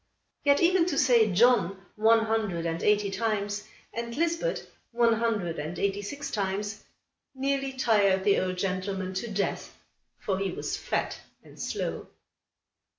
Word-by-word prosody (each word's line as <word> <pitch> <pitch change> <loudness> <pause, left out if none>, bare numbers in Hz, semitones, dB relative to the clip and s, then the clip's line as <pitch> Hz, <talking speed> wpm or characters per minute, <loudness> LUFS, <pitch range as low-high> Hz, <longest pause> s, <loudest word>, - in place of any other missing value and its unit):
Yet 285 +2 +4
even 350 0 +4
to 300 -6 -1
say 235 -5 +4
"John" 195 -2 +4 0.2
one 225 +1 +4
hundred 215 -7 -1
and 165 0 -2
eighty 210 -1 +2
times, 205 0 -1 0.3
and 235 +1 -5
"Lisbet" 335 +9 -1 0.2
one 235 -1 +3
hundred 220 -8 -1
and 155 +4 -5
eighty 200 0 0
six 285 +8 -6
times, 205 +1 -2 0.5
nearly 275 0 -1
tired 205 -7 +3
the 200 - +4
old 185 0 -2
gentleman 185 0 -2
to 210 +5 -3
death, 200 0 -2 0.4
for 190 -2 -2
he 195 0 -1
was - - -3
fat - - -2 0.2
and - - -13
slow. - - -3
210 Hz, 145 wpm, -28 LUFS, 195-240 Hz, 0.5 s, Yet